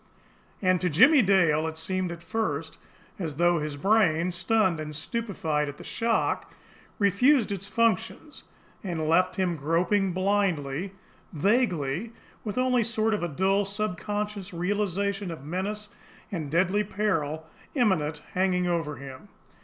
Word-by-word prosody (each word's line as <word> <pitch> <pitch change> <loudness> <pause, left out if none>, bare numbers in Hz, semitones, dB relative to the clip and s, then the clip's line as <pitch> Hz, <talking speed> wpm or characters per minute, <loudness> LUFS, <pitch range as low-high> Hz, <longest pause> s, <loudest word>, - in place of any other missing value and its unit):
And 185 -1 +3
to 180 - +1
Jimmie 270 - +6
Dale 175 -7 +3
it 160 0 -5
seemed 185 +2 -2
at 170 0 -8
first 165 -6 -3 0.4
as 160 -6 -3
though 175 +1 +3
his 150 -1 -4
brain, 180 -2 +3
stunned 185 -1 +1
and 150 -1 -6
stupefied 160 -6 -2
at 145 - -9
the - - -10
shock, 230 -1 -1 0.5
refused 215 +4 +3
its 195 0 -3
functions, 230 +7 -1 0.4
and 165 -5 -2
left 180 +3 +3
him 185 -3 0
groping 175 +6 +1
blindly, 185 -3 0 0.4
vaguely, 185 - 0 0.3
with 210 0 -5
only 255 -1 +3
a - - 0
sort 220 -1 +1
of 175 -8 -2
dull, 195 +3 +2
subconscious 205 -1 -3
realisation 200 +1 -1
of 160 -5 -8
menace 205 +6 -3 0.4
and 165 -6 -3
a - - -9
deadly 185 +6 +2
peril, 165 -7 -1 0.3
imminent, 160 - +1
hanging 180 -1 +1
over 165 -4 -1
him. 135 -2 -10
185 Hz, 140 wpm, -27 LUFS, 160-210 Hz, 0.5 s, Jimmie